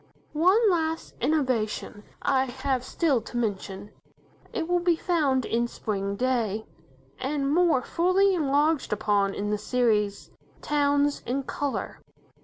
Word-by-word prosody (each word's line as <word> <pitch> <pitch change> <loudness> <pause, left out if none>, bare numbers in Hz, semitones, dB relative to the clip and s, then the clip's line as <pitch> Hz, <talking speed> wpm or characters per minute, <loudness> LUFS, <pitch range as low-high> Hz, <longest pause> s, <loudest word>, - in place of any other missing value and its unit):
One 370 +9 +4
last 325 -2 -1
innovation 250 -8 -1 0.2
I 265 -1 +2
have 265 0 -2
still 275 -2 +1
to 240 - -7
mention. 205 -3 -3 0.6
It 365 -9 -3
will 355 0 +2
be 345 -1 +2
found 290 -8 +1
in 235 +1 0
"Spring 200 -4 -3
Day", 225 -3 -1 0.5
and 280 +1 -1
more 335 -6 +3
fully 370 +5 +2
enlarged 300 -2 +1
upon 205 -1 +1
in 205 +1 -2
the 210 - 0
series, 210 -3 0 0.3
"Towns 285 -1 +1
in 270 +3 -1
Colour". 285 +1 -4
265 Hz, 125 wpm, -26 LUFS, 220-320 Hz, 0.6 s, One